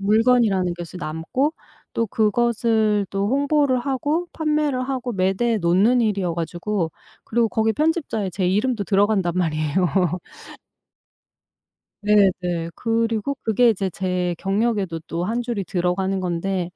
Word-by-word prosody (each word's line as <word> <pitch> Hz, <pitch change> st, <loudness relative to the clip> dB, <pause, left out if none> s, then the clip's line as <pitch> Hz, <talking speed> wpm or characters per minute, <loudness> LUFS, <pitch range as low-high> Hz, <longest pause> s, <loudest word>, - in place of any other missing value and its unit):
물건이라는 210 Hz, -4 st, +3 dB
것이 175 Hz, +1 st, -8 dB
남고 170 Hz, -, -2 dB, 0.4 s
또 230 Hz, -, 0 dB
그것을 220 Hz, -1 st, +1 dB
또 195 Hz, 0 st, -1 dB
홍보를 280 Hz, 0 st, +2 dB
하고 290 Hz, +6 st, -1 dB
판매를 300 Hz, -4 st, 0 dB
하고 255 Hz, -2 st, -2 dB
매대에 195 Hz, +4 st, +1 dB
놓는 195 Hz, +8 st, +3 dB
일이어 195 Hz, -6 st, 0 dB
가지고 175 Hz, +1 st, -2 dB, 0.3 s
그리고 230 Hz, 0 st, +1 dB
거기 220 Hz, +1 st, +1 dB
편집자에 295 Hz, -, -1 dB
제 185 Hz, 0 st, -1 dB
이름도 210 Hz, +3 st, +1 dB
들어간단 200 Hz, -3 st, +2 dB
말이에요. 155 Hz, -4 st, -1 dB, 2.3 s
네네. 180 Hz, -5 st, +2 dB
그리고 230 Hz, +3 st, -1 dB
그게 230 Hz, +2 st, +4 dB
이제 195 Hz, -2 st, -1 dB
제 180 Hz, 0 st, -1 dB
경력에도 195 Hz, -4 st, 0 dB
또 170 Hz, +1 st, -3 dB
1 230 Hz, +5 st, -1 dB
줄이 235 Hz, -4 st, -3 dB
들어가는 190 Hz, +2 st, -1 dB
건데 180 Hz, 0 st, -2 dB
205 Hz, 285 characters per minute, -22 LUFS, 180-240 Hz, 2.3 s, 그게